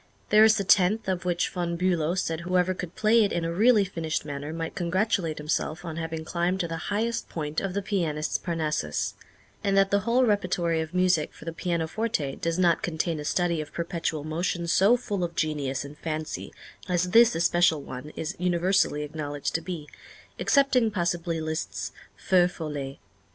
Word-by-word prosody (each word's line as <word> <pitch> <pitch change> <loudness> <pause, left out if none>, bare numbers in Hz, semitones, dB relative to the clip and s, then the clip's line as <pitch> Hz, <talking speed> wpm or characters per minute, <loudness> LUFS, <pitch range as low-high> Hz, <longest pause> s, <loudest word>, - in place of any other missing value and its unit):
There 215 +1 +8
is 220 -1 +6
the 200 - 0
tenth, 195 +3 +3
of 185 -1 -1
which 175 -1 +1
Von 170 -2 -2
Bülow 175 -1 +1
said 165 -3 -1
whoever 180 +1 +1
could 180 -1 -7
play 225 +1 +4
it 200 - 0
in 170 -1 -1
a 165 - -2
really 215 +2 +5
finished 165 -5 -3
manner 145 0 -5
might 165 0 -4
congratulate 180 -2 0
himself 155 +2 -2
on 165 -1 -5
having 160 -1 -4
climbed 175 +3 0
to 170 - -2
the 165 -1 -5
highest 225 +3 -1
point 155 -2 -3
of 195 -1 -3
the 200 - -1
pianist's 165 -7 -1
Parnassus, 155 - -2 0.5
and 195 -1 +2
that 195 0 +4
the 200 - +4
whole 235 +5 +2
repertory 180 -6 +1
of 160 +3 -6
music 180 -4 +2
for - - -13
the 165 - -4
pianoforte 165 - -2
does 165 0 -1
not 175 -3 +3
contain 165 -1 -2
a - - -5
study 170 +1 0
of 150 - -9
perpetual 165 -3 -2
motion 170 +2 -2
so 195 +7 +4
full 205 -6 -3
of 170 -1 -3
genius 145 -3 -1
and 145 +1 -11
fancy 155 -1 -4 0.4
as 180 0 +1
this 235 +2 +6
especial 170 -2 +3
one 130 +3 -7
is 160 +3 -4
universally 180 -3 +2
acknowledged 145 -1 -4
to 165 - 0
be, 165 -3 -6 0.5
excepting, 265 -5 +3
possibly, 175 -4 -1
Liszt's 155 0 -3 0.3
"Feux 180 -2 +3
Follets." 145 -5 -5
170 Hz, 180 wpm, -27 LUFS, 160-190 Hz, 0.5 s, There